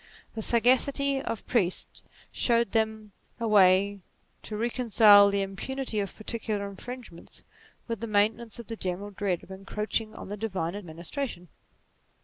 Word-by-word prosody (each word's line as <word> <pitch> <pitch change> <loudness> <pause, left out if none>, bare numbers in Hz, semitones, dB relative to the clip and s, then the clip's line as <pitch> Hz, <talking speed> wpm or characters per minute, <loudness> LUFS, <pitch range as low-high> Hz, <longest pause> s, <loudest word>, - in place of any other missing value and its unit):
The 220 - -4
sagacity 265 +4 +2
of 230 -5 -5
priests 190 -7 -1 0.3
showed 235 -3 +2
them 220 -1 -1 0.3
a 230 - -1
way 200 -1 +5 0.4
to 210 - -6
recon 240 +2 -2
cile 205 -2 +8
the 200 0 +1
impunity 225 +4 -3
of 200 -1 -3
particular 215 -2 -3
infringements 215 -2 -10 0.4
with 230 -3 -3
the 230 - -4
c - - -9
2 - - -8
22 - - +4
NATURE 205 +2 +5
maintenance 235 -3 -10
of 235 - -8
the 225 - -6
general 190 +1 -4
dread 195 -3 -2
of - - -14
encroaching 210 +3 -3
on - - -9
the 205 - -5
divine 190 -5 -3
administration. 175 - -6
210 Hz, 160 wpm, -28 LUFS, 195-235 Hz, 0.4 s, cile